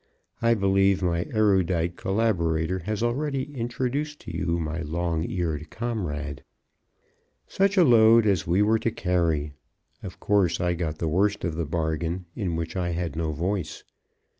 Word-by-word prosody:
I 115 Hz, 0 st, +4 dB
believe 95 Hz, -1 st, +2 dB
my 85 Hz, -1 st, 0 dB
erudite 95 Hz, -5 st, +2 dB
collaborator 95 Hz, -5 st, 0 dB
has 105 Hz, +5 st, -3 dB
already 140 Hz, +3 st, -2 dB
introduced 130 Hz, +5 st, -2 dB
to -, -, -8 dB
you 85 Hz, -1 st, 0 dB
my 80 Hz, 0 st, -3 dB
long 85 Hz, +1 st, -2 dB
eared 80 Hz, -4 st, -3 dB
comrade. 75 Hz, -, -4 dB, 1.0 s
Such 195 Hz, +1 st, +1 dB
a 180 Hz, -, +7 dB
load 115 Hz, -4 st, +6 dB
as 95 Hz, -3 st, +1 dB
we 90 Hz, +5 st, +3 dB
were 110 Hz, +2 st, +3 dB
to 115 Hz, -, 0 dB
carry! 85 Hz, -7 st, 0 dB, 0.5 s
Of -, -, -9 dB
course, 100 Hz, -5 st, +2 dB
I 90 Hz, -1 st, +1 dB
got 80 Hz, -3 st, -3 dB
the 80 Hz, -, -2 dB
worst 100 Hz, +6 st, +1 dB
of 85 Hz, -, -1 dB
the 80 Hz, +1 st, -2 dB
bargain 80 Hz, +2 st, -2 dB
in 95 Hz, -7 st, -2 dB
which 80 Hz, +1 st, -4 dB
I 90 Hz, -2 st, -1 dB
had 85 Hz, -1 st, -3 dB
no 80 Hz, -1 st, -1 dB
voice. 90 Hz, +3 st, -3 dB
90 Hz, 155 wpm, -25 LUFS, 80-110 Hz, 1.0 s, a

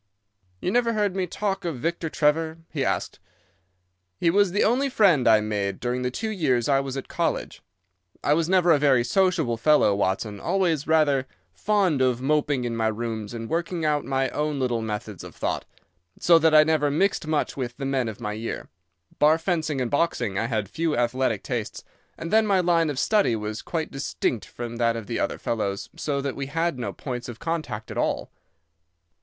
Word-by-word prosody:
"You 180 Hz, -, -1 dB
never 235 Hz, +1 st, +2 dB
heard 205 Hz, -3 st, 0 dB
me 185 Hz, -1 st, -1 dB
talk 195 Hz, +2 st, -2 dB
of 165 Hz, -6 st, -3 dB
Victor 165 Hz, +5 st, -2 dB
Trevor?" 160 Hz, +2 st, +1 dB
he 140 Hz, -4 st, -1 dB
asked. 95 Hz, -2 st, -2 dB, 1.0 s
"He 165 Hz, -, +2 dB
was 200 Hz, 0 st, +3 dB
the 205 Hz, -, +2 dB
only 260 Hz, +5 st, +2 dB
friend 185 Hz, -, +4 dB
I 110 Hz, -1 st, +6 dB
made 105 Hz, -2 st, -2 dB
during 125 Hz, +1 st, -2 dB
the 125 Hz, -, 0 dB
two 220 Hz, -, -3 dB
years 135 Hz, -, +1 dB
I 140 Hz, -1 st, +3 dB
was 135 Hz, -1 st, -4 dB
at 135 Hz, -, -5 dB
college. -, -, -2 dB, 0.6 s
I 145 Hz, -, +3 dB
was 165 Hz, +1 st, +1 dB
never 180 Hz, -2 st, +4 dB
a 150 Hz, -, +5 dB
very 135 Hz, -4 st, +4 dB
sociable 160 Hz, -5 st, +1 dB
fellow, 120 Hz, -3 st, +4 dB
Watson, 100 Hz, +1 st, -1 dB
always 170 Hz, -, 0 dB
rather 145 Hz, -4 st, +3 dB, 0.3 s
fond 195 Hz, -9 st, +1 dB
of 125 Hz, -2 st, +2 dB
moping 145 Hz, -1 st, +1 dB
in 120 Hz, -1 st, -2 dB
my 115 Hz, -1 st, +1 dB
rooms 110 Hz, -1 st, -3 dB
and 115 Hz, 0 st, -5 dB
working 170 Hz, +1 st, -2 dB
out 150 Hz, -1 st, +1 dB
my 135 Hz, 0 st, 0 dB
own 150 Hz, -1 st, -2 dB
little 120 Hz, -3 st, 0 dB
methods 105 Hz, -3 st, -5 dB
of -, -, -11 dB
thought, -, -, -2 dB, 0.5 s
so 170 Hz, -1 st, +5 dB
that 160 Hz, -1 st, +4 dB
I 155 Hz, -, +9 dB
never 155 Hz, -2 st, +2 dB
mixed 165 Hz, +2 st, +1 dB
much 155 Hz, -1 st, 0 dB
with 120 Hz, -3 st, -4 dB
the 135 Hz, -, -4 dB
men 135 Hz, -3 st, 0 dB
of 110 Hz, -, -8 dB
my 105 Hz, -3 st, -3 dB
year. 110 Hz, +2 st, -5 dB, 0.5 s
Bar 155 Hz, +2 st, +5 dB
fencing 160 Hz, -4 st, -1 dB
and 125 Hz, -2 st, -2 dB
boxing 135 Hz, -, 0 dB
I 115 Hz, +4 st, 0 dB
had 110 Hz, -4 st, -1 dB
few 160 Hz, -, -1 dB
athletic 120 Hz, -3 st, 0 dB
tastes, 120 Hz, -5 st, -4 dB, 0.3 s
and 165 Hz, -, -5 dB
then 220 Hz, 0 st, +5 dB
my 195 Hz, -2 st, +3 dB
line 170 Hz, -3 st, +2 dB
of 145 Hz, -, -3 dB
study 200 Hz, -, +2 dB
was 105 Hz, 0 st, -4 dB
quite 160 Hz, -2 st, -3 dB
distinct 135 Hz, -4 st, -2 dB
from 120 Hz, -1 st, -7 dB
that 115 Hz, -1 st, +2 dB
of 115 Hz, -2 st, -5 dB
the -, -, -3 dB
other -, -, -1 dB
fellows, 100 Hz, -4 st, -3 dB
so 140 Hz, -2 st, -2 dB
that 140 Hz, -1 st, -3 dB
we 140 Hz, -1 st, -4 dB
had 165 Hz, -1 st, -1 dB
no 125 Hz, -, -3 dB
points 125 Hz, -3 st, -6 dB
of 120 Hz, -, -7 dB
contact 155 Hz, -8 st, -4 dB
at -, -, -3 dB
all. -, -, -1 dB
140 Hz, 195 wpm, -25 LUFS, 120-165 Hz, 1.0 s, I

